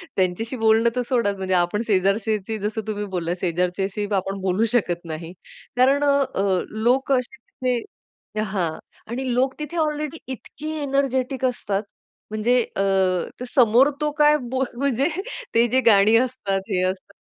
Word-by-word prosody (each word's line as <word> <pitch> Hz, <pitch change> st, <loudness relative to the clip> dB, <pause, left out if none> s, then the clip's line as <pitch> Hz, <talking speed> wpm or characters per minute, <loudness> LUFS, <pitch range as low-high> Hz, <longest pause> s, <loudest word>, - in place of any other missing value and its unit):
त्यांच्याशी 190 Hz, +7 st, 0 dB
बोलणं 225 Hz, +1 st, +4 dB
तर 250 Hz, -, +1 dB
सोडाच 230 Hz, -6 st, +1 dB
म्हणजे 190 Hz, -1 st, -2 dB
आपण 175 Hz, +5 st, +1 dB
शेजारच्याची 205 Hz, +2 st, +1 dB
जसं 215 Hz, +2 st, -2 dB
तुम्ही 210 Hz, -1 st, -2 dB
बोललात, 175 Hz, -1 st, -1 dB
शेजारच्याशी 180 Hz, +3 st, -1 dB
आपण 195 Hz, +1 st, -2 dB
बोलू 190 Hz, +4 st, +1 dB
शकत 175 Hz, -8 st, 0 dB
नाही. 165 Hz, +1 st, -6 dB, 0.5 s
कारण 275 Hz, +3 st, +4 dB
अ, 200 Hz, -10 st, +2 dB, 0.2 s
लोक 265 Hz, +3 st, +2 dB
असे 255 Hz, +3 st, 0 dB, 0.3 s
तिथे 245 Hz, -, -4 dB
हां 190 Hz, -6 st, -1 dB, 0.4 s
आणि 255 Hz, 0 st, -2 dB
लोक 260 Hz, +2 st, +2 dB
तिथे 300 Hz, +3 st, -5 dB
ऑलरेडी 300 Hz, +1 st, -3 dB, 0.2 s
इतके 295 Hz, +4 st, -8 dB
एनर्जेटिक 265 Hz, -2 st, 0 dB
असतात 210 Hz, -5 st, -1 dB, 0.5 s
म्हणजे 240 Hz, +3 st, +2 dB
अ, 195 Hz, -, +1 dB, 0.7 s
समोर 250 Hz, +2 st, +6 dB
तो 300 Hz, 0 st, +1 dB
काय 300 Hz, 0 st, +6 dB
बो 260 Hz, 0 st, +1 dB
म्हणजे 275 Hz, +2 st, +1 dB, 0.5 s
ते 235 Hz, +1 st, +5 dB
जे 260 Hz, +3 st, +2 dB
गाणी 205 Hz, +2 st, +5 dB
असतात, 195 Hz, -5 st, -3 dB
हे 185 Hz, -3 st, +1 dB
असतात. 185 Hz, -1 st, -13 dB
225 Hz, 140 wpm, -23 LUFS, 195-260 Hz, 0.7 s, समोर